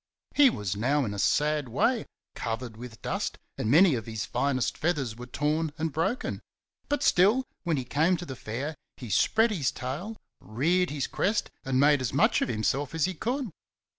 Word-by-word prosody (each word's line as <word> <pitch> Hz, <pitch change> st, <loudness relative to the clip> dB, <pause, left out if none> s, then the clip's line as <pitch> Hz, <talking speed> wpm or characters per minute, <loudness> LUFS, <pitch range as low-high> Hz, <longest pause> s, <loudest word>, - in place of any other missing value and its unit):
He 285 Hz, -2 st, +7 dB
was 105 Hz, -, -3 dB
now 135 Hz, +6 st, +1 dB
in 105 Hz, -, -3 dB
a 100 Hz, -, -5 dB
sad 150 Hz, +3 st, +1 dB
way, 230 Hz, -, +1 dB, 0.3 s
covered 115 Hz, 0 st, -4 dB
with 115 Hz, -2 st, -10 dB
dust, -, -, -2 dB, 0.2 s
and 110 Hz, -, -2 dB
many 165 Hz, +5 st, +6 dB
of 115 Hz, -3 st, -3 dB
his 110 Hz, -2 st, -3 dB
finest 135 Hz, -3 st, 0 dB
feathers 145 Hz, -9 st, -1 dB
were 120 Hz, +1 st, -9 dB
torn 150 Hz, +4 st, 0 dB
and 160 Hz, 0 st, -1 dB
broken; 165 Hz, +11 st, -1 dB, 0.5 s
but 290 Hz, -, 0 dB
still, 210 Hz, +9 st, +4 dB, 0.2 s
when 165 Hz, -3 st, +1 dB
he 130 Hz, -, -1 dB
came 160 Hz, +8 st, +2 dB
to 175 Hz, -, -7 dB
the 135 Hz, -, -6 dB
Fair 130 Hz, +7 st, -4 dB, 0.2 s
he 120 Hz, -5 st, -7 dB
spread 225 Hz, -, +3 dB
his 150 Hz, -11 st, 0 dB
tail, 155 Hz, -, -5 dB, 0.2 s
reared 170 Hz, +11 st, +1 dB
his 145 Hz, -2 st, -2 dB
crest 210 Hz, +3 st, -1 dB
and 130 Hz, -1 st, 0 dB
made 145 Hz, -1 st, +5 dB
as 130 Hz, -, -2 dB
much 140 Hz, -, +3 dB
of -, -, 0 dB
himself 130 Hz, +6 st, -1 dB
as 160 Hz, -, +2 dB
he 185 Hz, -, -2 dB
could. 245 Hz, -, -2 dB
145 Hz, 190 wpm, -28 LUFS, 125-175 Hz, 0.5 s, He